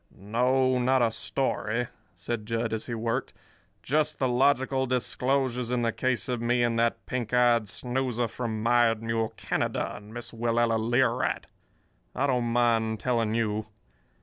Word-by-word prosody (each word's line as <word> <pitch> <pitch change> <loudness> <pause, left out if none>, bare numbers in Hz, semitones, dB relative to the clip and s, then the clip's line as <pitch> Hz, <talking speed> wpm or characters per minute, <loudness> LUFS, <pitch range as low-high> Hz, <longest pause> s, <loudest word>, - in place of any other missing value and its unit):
"No, 125 +5 +2
not 130 0 +3
a 115 - +2
story," 115 -1 -1 0.3
said 115 -3 -4
Jud, 115 0 -1
as 110 - -3
he 120 - -3
worked, 115 +3 -2
"but 100 +2 -33
just 150 +5 +1
the 130 - +1
logical 130 +1 +2
disclosures 125 0 0
in 125 -1 0
the 115 - +2
case 125 -2 -1
of 125 -2 -2
me 120 +1 +2
and 115 -1 +1
that 115 0 0
pink 125 -2 -2
eyed 120 -4 +4
snoozer 125 -1 -1
from 110 -1 -4
Mired 115 -1 +3
Mule 115 -1 -1
Canada - - -2
and 105 +1 -11
Miss 120 0 -6
Willella 115 0 +1
Learight. 120 +2 +1 0.7
I 140 - +1
don't 125 -3 +1
mind 115 -2 +1
telling 115 -3 0
you. 110 -2 -1
120 Hz, 155 wpm, -27 LUFS, 115-125 Hz, 0.7 s, eyed